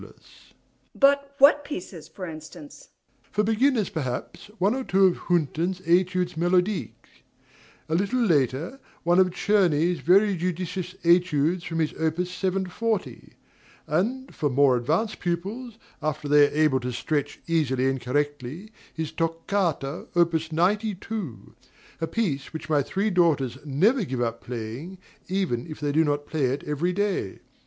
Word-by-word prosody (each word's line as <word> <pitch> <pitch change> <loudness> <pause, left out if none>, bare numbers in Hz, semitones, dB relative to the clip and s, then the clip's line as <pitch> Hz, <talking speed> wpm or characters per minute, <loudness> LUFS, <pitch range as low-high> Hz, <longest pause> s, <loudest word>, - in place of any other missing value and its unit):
MRS. - - -10
SOLID. - - -14 0.8
But 280 0 +3
what 290 +1 +6
pieces, 185 - -7
for 185 - -8
instance? 170 - -10
DOMINIE. - - -38
For 210 - +2
beginners, 225 0 +2
perhaps 130 -7 -4
one 200 +3 +2
or 265 +1 -2
two 195 -4 +3
of 185 - +3
Hünten's 175 +2 0
Etudes 180 +1 +2
Melodiques; 180 - -1 0.7
a 160 - -3
little 200 +9 +1
later, 160 - +1 0.2
one 175 +2 +4
of 185 -1 +5
Czerny's 180 -3 +2
very 200 +3 +4
judicious 180 +1 -3
Etudes 170 -1 +3
from 165 - -4
his 160 -2 0
opus 160 +3 -1
740; 190 +3 -2 0.5
and 260 +7 -1
for 150 - -1
more 135 0 +4
advanced 160 - 0
pupils, 205 +7 -4 0.2
after 155 -1 -2
they 145 0 +6
are - - -8
able 150 -4 +3
to 125 0 -4
stretch 145 +3 -2
easily 135 -6 +1
and 135 -1 -1
correctly, 145 - -3 0.2
his 160 -2 -4
Toccata, 165 -2 -2
opus 165 -2 +2
92, 190 - -2 0.5
a 165 - 0
piece 155 -12 -2
which 160 0 -6
my 145 -2 +4
three 195 +9 -1
daughters 145 -8 +2
never 195 - +2
give 130 -8 -4
up 115 -1 -2
playing, 125 +10 -6 0.3
even 180 -10 -1
if 155 - -8
they 145 -1 -1
do 160 +3 +3
not 145 -1 -1
play 150 -3 -1
it 130 +3 -1
every 150 +5 -1
day. 195 - -1
170 Hz, 150 wpm, -25 LUFS, 145-195 Hz, 0.8 s, what